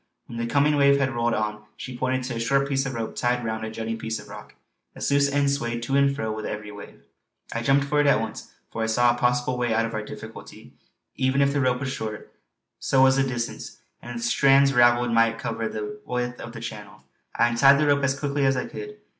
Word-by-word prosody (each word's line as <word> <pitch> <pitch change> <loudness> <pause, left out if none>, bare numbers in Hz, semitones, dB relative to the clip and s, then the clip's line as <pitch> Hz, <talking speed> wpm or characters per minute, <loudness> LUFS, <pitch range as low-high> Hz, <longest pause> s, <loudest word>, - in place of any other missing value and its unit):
When 115 - -8
the 115 - -2
coming 145 +3 +2
wave 140 0 +5
had 130 -1 0
rolled 120 -1 0
on 105 0 -2 0.2
she 130 - -7
pointed 130 +1 -1
to 125 0 -4
a - - -3
short 135 +4 +1
piece 135 -1 0
of 130 - -5
rope 115 -1 -4
tied 120 0 0
round 110 0 -3
a 110 - -4
jutting 115 0 -5
piece 110 0 -3
of - - -12
rock; - - -11 0.4
its - - -2
loose 140 0 +3
end 140 0 +2
swayed 120 -4 -2
to 135 +3 -1
and 140 0 +3
fro 110 -6 -3
with 110 0 -5
every 105 0 -6
wave. 105 0 -12 0.5
I 115 - -2
jumped 135 +3 +3
for 145 +1 +2
it 145 - +2
at 140 - +4
once, 110 -1 -6 0.2
for 115 - -4
I 110 - 0
saw 120 +2 +3
a - - -5
possible 125 +1 +1
way 120 -2 0
out 115 0 +2
of 115 - -6
our 110 - -2
difficulty; 105 - -11 0.4
even 130 +1 +1
if 140 0 +3
the 145 - +1
rope 130 -1 +1
were - - -2
short, 110 -5 -5 0.5
so 130 -1 +3
was 135 0 +5
the 135 - +3
distance, 120 -3 -4 0.2
and 120 0 -8
its 115 - -3
strands 135 +2 +4
ravelled 120 -1 +4
might 115 0 +3
cover 115 -1 -3
the 110 +6 -6
width 125 0 -3
of 120 - -8
the 115 - -8
channel. 105 -3 -9 0.3
I 120 - +3
untied 135 +4 +5
the 150 - +2
rope 145 -1 +2
as 140 0 0
quickly 145 -1 -1
as 135 -1 +2
I 125 - -2
could. 420 0 -8
125 Hz, 245 wpm, -24 LUFS, 115-140 Hz, 0.5 s, wave